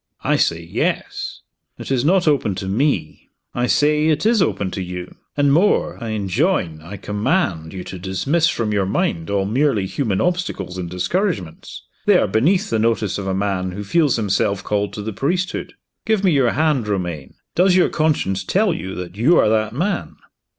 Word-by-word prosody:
"I - - +2
say, 85 0 +1
Yes!" 85 - -3 0.4
"It - - -7
is 125 -2 +1
not 180 +3 +3
open 135 -10 +2
to 95 0 -5
Me!" 100 - -1 0.2
"I 120 0 0
say 150 +3 +3
it 155 +4 +1
is 225 -2 +4
open 100 - 0
to 95 - -4
You. 90 0 -6 0.2
And 145 -1 +3
more 175 -6 +2
I 115 - -4
enjoin, 100 - 0
I 90 +6 -8
command, 105 - -1
you 95 -1 -6
to 95 - -8
dismiss 135 - +1
from 115 -8 -1
your 100 -2 +1
mind 85 -3 -1
all 100 -1 0
merely 115 -1 +1
human 100 -1 -1
obstacles 135 - -2
and 85 -2 -4
discouragements. 90 - -3 0.2
They - - +6
are - - +3
beneath 175 - +2
the 110 - +1
notice 110 -3 0
of 95 - -5
a 95 - 0
man 95 -2 -1
who 100 +2 -5
feels 145 - +2
himself 100 -2 0
called 105 -1 -1
to 105 - -5
the 110 +1 -4
priesthood. 175 - -2 0.3
Give 220 -2 +2
me 190 - +4
your 135 -5 +3
hand, 150 -8 +1
Romayne! 90 -8 -3 0.2
Does 180 +2 +4
your 185 - +4
conscience 145 - 0
tell 195 - +2
you 95 - -5
that 90 +1 -7
you 140 +11 +4
are - - +4
that 110 0 +1
man?" 180 - -2
110 Hz, 185 wpm, -20 LUFS, 95-155 Hz, 0.4 s, They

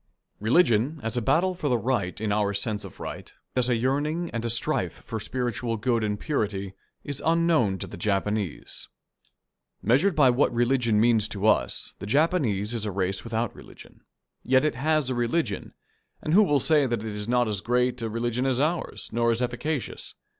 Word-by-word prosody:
Religion, 125 - +3
as 115 +1 -3
a 120 - 0
battle 165 +10 +2
for 165 -5 -3
the 125 - +3
right 110 -7 -1
in 110 -1 -1
our 100 -1 +1
sense 105 +1 -2
of - - -11
right, - - -7 0.2
as 125 -1 +2
a 120 - +3
yearning 145 +8 -1
and 115 -1 -3
a 115 - -1
strife 115 - 0
for 110 - -4
spiritual 120 +1 -2
good 115 +1 0
and 105 -1 -1
purity, 100 -10 -2 0.3
is 145 -2 -5
unknown 165 - +2
to - - -5
the - - -9
Japanese. 100 -1 -2 1.0
Measured 155 - +3
by 145 -3 +5
what 125 +4 +2
religion 120 -2 +2
means 110 -2 +4
to 100 -1 -4
us, - - +1
the 100 - -6
Japanese 120 - +1
is 115 -3 -2
a - - -2
race 95 0 -1
without 115 0 -2
religion. - - -15 0.4
Yet 130 +3 +3
it 155 - +1
has 150 +1 0
a - - +1
religion, 120 - -1 0.4
and 155 - -2
who 205 +2 +6
shall 145 -3 +3
say 150 0 +3
that 120 -3 -1
it 110 -1 -4
is 105 0 -4
not 120 0 +2
as 105 -3 -2
great 125 +1 0
a 115 - -2
religion 120 +3 -1
as 130 -1 +1
ours, 160 +4 -1
nor 115 0 +2
as 115 0 +1
efficacious? 125 +3 -4
120 Hz, 190 wpm, -26 LUFS, 105-140 Hz, 1.0 s, who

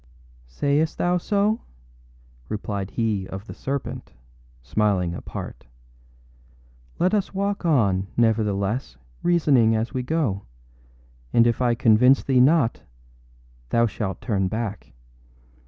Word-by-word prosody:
â - - -28 0.3
âSayest 160 - -1
thou 175 0 +1
so?â 205 +4 +1 0.9
replied 100 -2 -4
he 105 -5 -1
of 95 +2 -7
the - - -9
serpent, 135 0 -5 0.5
smiling 95 - 0
apart. - - -8 1.3
âLet 180 +3 +2
us 200 -2 0
walk 200 -1 -1
on, 100 - +2
nevertheless, 105 - 0 0.2
reasoning 140 -10 +3
as 110 +2 -2
we 130 - -1
go; 125 -8 -1 0.9
and 115 - +5
if 120 +1 +1
I 120 -1 +2
convince 125 +2 +4
thee 130 -2 +2
not 135 -3 +3 0.9
thou 115 0 +3
shalt 100 -4 -4
turn 100 -5 0
back. 110 -2 -4
115 Hz, 115 wpm, -24 LUFS, 100-140 Hz, 1.3 s, and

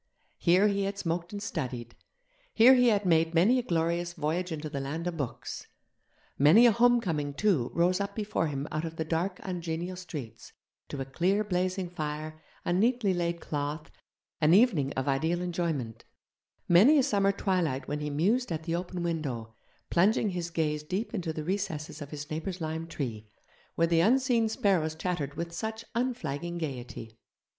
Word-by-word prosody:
Here 185 +4 +4
he 200 -1 0
had 200 0 -3
smoked 170 -1 -2
and 205 -1 -5
studied, 125 - -4 0.6
here 240 +4 +8
he 250 -1 +5
had 210 -3 +2
made 165 -1 +3
many 215 +10 +5
a - - 0
glorious 170 -3 -1
voyage 175 +4 -2
into 155 -1 -4
the 145 -2 -4
land 145 +5 -4
of 175 -1 -2
books. 140 -7 -5 0.7
Many 160 - +7
a 240 - +7
homecoming, 200 -12 +2
too, 170 - +2
rose 180 +3 +2
up 200 - -4
before 210 -6 -1
him 140 0 -3
out 155 +1 -2
of 165 -1 -5
the 160 - -3
dark 175 +4 -1
ungenial 175 -1 -4
streets, 145 -11 -8 0.4
to 140 - -4
a - - -3
clear 180 +10 +1
blazing 185 -1 -1
fire, 155 -2 -5 0.2
a 175 - +1
neatly 220 +1 +2
laid 170 -1 -2
cloth, 150 +1 -4 0.5
an 160 +2 +5
evening 190 - +4
of 130 +1 -2
ideal 160 +5 +1
enjoyment; 170 -10 -3 0.6
many 215 - +7
a 275 - +4
summer 200 -4 +2
twilight 175 -10 -1
when 150 +1 -2
he 150 0 -3
mused 195 - +1
at 160 -1 -3
the 165 0 -3
open 175 0 -3
window, 135 -10 -3 0.4
plunging 205 +4 +3
his 175 -1 -3
gaze 155 -3 -1
deep 190 +11 -3
into 180 -7 -2
the 155 -1 -5
recesses 160 -4 -3
of 145 - -7
his 150 0 -7
neighbour's 175 +4 -4
lime 160 0 -4
tree, 115 -9 -5 0.5
where 165 - +3
the 165 0 +2
unseen 240 +1 +3
sparrows 180 -8 +1
chattered 160 -4 -3
with 170 +1 -4
such 220 +3 -4
unflagging 175 - -2
gaiety. 120 -7 -6
170 Hz, 170 wpm, -29 LUFS, 150-195 Hz, 0.7 s, here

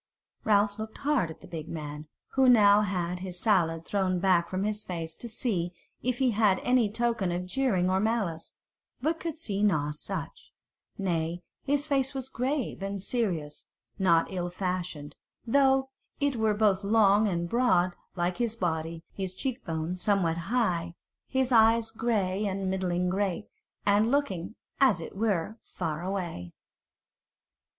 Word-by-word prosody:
Ralph 205 -1 +2
looked 220 0 -6
hard 280 - +1
at 160 - -10
the - - -12
big 160 -2 -6
man, 150 -1 -6 0.2
who 265 -1 +4
now 210 -3 +7
had 180 -3 -2
his 180 -1 -6
salade 170 -6 +2
thrown 190 -2 0
back 180 -2 +3
from 185 +1 -2
his 210 0 -1
face, 165 -3 -5
to 235 - -7
see 195 -7 -1 0.3
if 250 0 -1
he 260 -1 +2
gave 210 -3 +3
any 250 -4 +3
token 230 -5 0
of 175 +1 -2
jeering 190 -4 +1
or 190 +1 +2
malice, 200 -7 -1 0.4
but 315 +6 0
could 330 -2 -4
see 205 -10 -2
nought 150 -8 +2
such: 150 - -6 0.5
nay, 175 -2 -1 0.2
his 290 +1 +1
face 275 -2 0
was 265 -1 -4
grave 260 -2 -2
and 195 0 -3
serious, 180 -9 -2 0.3
not 170 -3 +4
ill 175 -2 -2
fashioned, 180 -5 -4 0.3
though 265 +1 +3 0.3
it 285 -2 +1
were 220 -2 +2
both 205 -2 +2
long 210 0 +4
and 170 -3 -1
broad 185 -5 +2 0.2
like 175 0 -1
his 235 -2 -1
body: 165 -4 -2
his 190 -2 -4
cheek 260 +3 -3
bones 165 +2 -3
somewhat 190 -6 +2
high, 175 -9 0 0.3
his 265 -1 0
eyes 225 -1 +5
grey 215 -4 0
and 190 -1 -2
middling 180 -1 0
great, 195 +1 -1 0.4
and 205 +2 +4
looking, 230 -9 -1 0.2
as 260 -9 +4
it 165 - -8
were, 210 0 -1
far 160 -3 -4
away. 175 - -4
195 Hz, 155 wpm, -28 LUFS, 175-230 Hz, 0.5 s, now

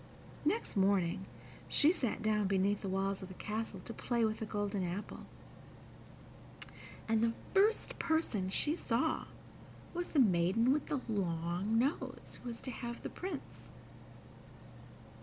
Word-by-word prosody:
Next 450 - 0
morning 190 -2 +2 0.4
she 300 +2 +5
sat 245 - -1
down 210 -2 +2
beneath 195 +1 +2
the 195 - -3
walls 195 +1 0
of 190 - -6
the 185 - -10
castle 215 -2 -4
to 230 - -5
play 235 0 +1
with 220 0 -1
the 220 - -3
golden 205 -1 -1
apple, 180 +4 -5 1.8
and 220 -1 +3
the 230 0 +3 0.2
first 415 +3 +3
person 320 - +1
she 295 +10 +1
saw 265 0 0 0.7
was 350 0 -3
the 300 - +4
maiden 205 +3 +4
with 295 - -1
the 280 - -1
long 180 0 0
nose, 265 +6 -1
who 245 - -5
was 230 - -6
to 260 - -4
have 240 0 -6
the - - -3
Prince. 360 -6 -7
215 Hz, 140 wpm, -35 LUFS, 195-255 Hz, 1.8 s, she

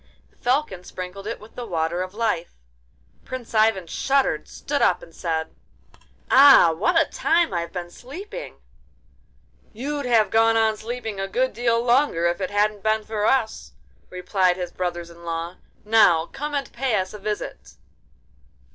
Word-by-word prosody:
The - - -32
Falcon 245 -8 -1
sprinkled 185 +3 -8
it 230 - -4
with 215 - -15
the 245 - -6
Water 170 -1 -1
of 185 +2 -6
Life—Prince 60 - -6
Ivan 215 -4 +3
shuddered, 270 +10 0
stood - - -3
up, - - +2
and - - -14
said: 160 -2 -3 0.8
'Ah! 270 -11 +8
what 325 - +2
a 325 - +4
time 330 - +1
I've 170 -1 -2
been 175 -2 -6
sleeping!' 370 - -9 1.2
'You'd 280 +4 -4
have 225 -3 +3
gone 225 0 +4
on 220 -1 +3
sleeping 225 -2 -5
a 195 - -2
good 255 +6 0
deal 230 +1 +1
longer 240 - +2
if 175 +3 0
it 185 - -1
hadn't 205 0 +1
been 215 +1 +1
for 215 0 -1
us,' 245 -5 0 0.4
replied 180 0 +1
his 180 -1 -4
brothers 175 -1 -4
in 170 0 -15
law. 170 +1 -4 0.3
'Now 210 -7 +5
come 295 - -5
and 280 -1 -3
pay 255 -2 0
us 190 -1 -2
a 210 - -8
visit. 210 +1 -5
210 Hz, 155 wpm, -23 LUFS, 175-245 Hz, 1.2 s, Ah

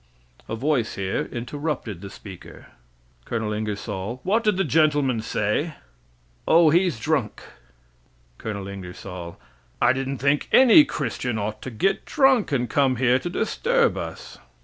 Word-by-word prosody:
[A 110 - -2
voice 130 -1 0
here 95 -1 -2
interrupted 120 - -4
the 100 - -8
speaker. 95 -2 -12 0.6
Col. 110 - -3
Ingersoll 105 +1 -4
What 215 +5 +1
did 210 -4 +2
the 195 - +2
gentleman 145 -6 +2
say? 105 -1 -1
A - - +1
voice 160 +1 -6 0.7
O, 165 -1 +6
he's 175 -6 +2
drunk. 135 -5 -1 1.0
Col. 100 -3 -5
Ingersoll 90 -2 -8 0.4
I - - +4
didn't 135 +1 -3
think 140 +3 +1
any 265 +4 +8
Christian 125 - -3
ought 105 +1 -4
to - - -6
get 125 - 0
drunk 270 - +3
and 125 -3 0
come 135 -1 +2
here 125 +1 +3
to 175 - -5
disturb 470 - +1
us. - - -7
130 Hz, 145 wpm, -24 LUFS, 105-160 Hz, 1.0 s, any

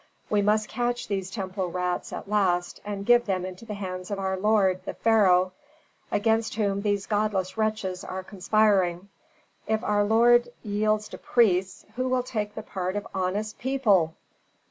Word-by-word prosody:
We 210 -1 +3
must 215 +1 +2
catch 245 0 -2
these 195 -2 -2
temple 190 -2 -3
rats 180 0 -2
at - - -6
last 185 -4 0
and 200 -1 -5
give 240 0 +4
them 185 -2 -1
into 185 +4 -8
the 210 -2 -5
hands 185 -2 -6
of 200 - -2
our 190 -1 -1
lord, 190 -2 +2
the - - -6
pharaoh, 185 -5 +4 0.6
against 225 +1 +1
whom 200 -2 0
these 205 -1 0
godless 205 -3 -1
wretches 215 -4 -2
are 185 0 -5
conspiring. 195 -2 +1 0.6
If 220 0 0
our 205 0 +2
lord 240 +3 +5 0.2
yields 210 0 0
to - - -9
priests, 190 -5 +1
who 255 0 0
will 255 -1 +1
take 210 -4 -4
the 220 - -5
part 185 -2 -4
of 205 - -3
honest 200 +3 -2
people?" 215 -11 +2
205 Hz, 165 wpm, -26 LUFS, 185-215 Hz, 0.6 s, lord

